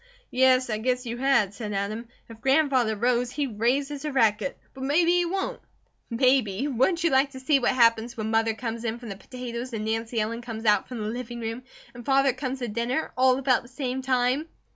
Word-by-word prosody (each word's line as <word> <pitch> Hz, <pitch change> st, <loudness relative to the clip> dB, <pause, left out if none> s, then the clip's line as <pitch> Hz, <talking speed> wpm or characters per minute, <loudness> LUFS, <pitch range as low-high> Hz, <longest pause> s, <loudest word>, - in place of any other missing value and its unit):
"Yes, 255 Hz, -1 st, +3 dB
I 215 Hz, -, -1 dB
guess 250 Hz, +2 st, -1 dB
you 235 Hz, 0 st, -4 dB
had," 240 Hz, -7 st, +2 dB
said 210 Hz, -1 st, -5 dB
Adam. 210 Hz, +4 st, -3 dB, 0.2 s
"If 225 Hz, -1 st, -13 dB
Grandfather 265 Hz, -4 st, +3 dB
rows, 240 Hz, +2 st, +1 dB
he 285 Hz, +3 st, -2 dB
raises 270 Hz, +5 st, -1 dB
a 300 Hz, -, -2 dB
racket. 225 Hz, -1 st, +1 dB, 0.2 s
But 265 Hz, -, -8 dB
maybe 335 Hz, +5 st, +3 dB
he 355 Hz, 0 st, +3 dB
won't!" 385 Hz, +3 st, -2 dB, 0.5 s
"Maybe! 250 Hz, -1 st, +2 dB
Wouldn't 295 Hz, +7 st, +1 dB
you 335 Hz, -, +3 dB
like 270 Hz, +1 st, +4 dB
to 260 Hz, -, -8 dB
see 275 Hz, +2 st, +3 dB
what 245 Hz, -, +1 dB
happens 230 Hz, -1 st, +3 dB
when 220 Hz, 0 st, -2 dB
Mother 225 Hz, 0 st, +2 dB
come 230 Hz, 0 st, -4 dB
in 230 Hz, 0 st, -3 dB
from 240 Hz, -1 st, -9 dB
the 200 Hz, -, -5 dB
potatoes 245 Hz, +3 st, -7 dB
and 215 Hz, -1 st, -3 dB
Nancy 225 Hz, +1 st, -2 dB
Ellen 225 Hz, +2 st, -2 dB
comes 230 Hz, -2 st, -7 dB
out 210 Hz, -1 st, +3 dB
from 250 Hz, -, -7 dB
the 210 Hz, -, -3 dB
living 240 Hz, +1 st, -5 dB
room, 225 Hz, +1 st, -4 dB, 0.3 s
and 240 Hz, -1 st, -10 dB
Father 270 Hz, +1 st, +3 dB
comes 265 Hz, 0 st, -4 dB
to 245 Hz, -2 st, -4 dB
dinner, 235 Hz, +7 st, -2 dB
all 255 Hz, 0 st, +4 dB
about 265 Hz, -2 st, +2 dB
the 240 Hz, -, -15 dB
same 260 Hz, 0 st, -3 dB
time?" 260 Hz, +3 st, +1 dB
245 Hz, 210 wpm, -26 LUFS, 225-265 Hz, 0.5 s, like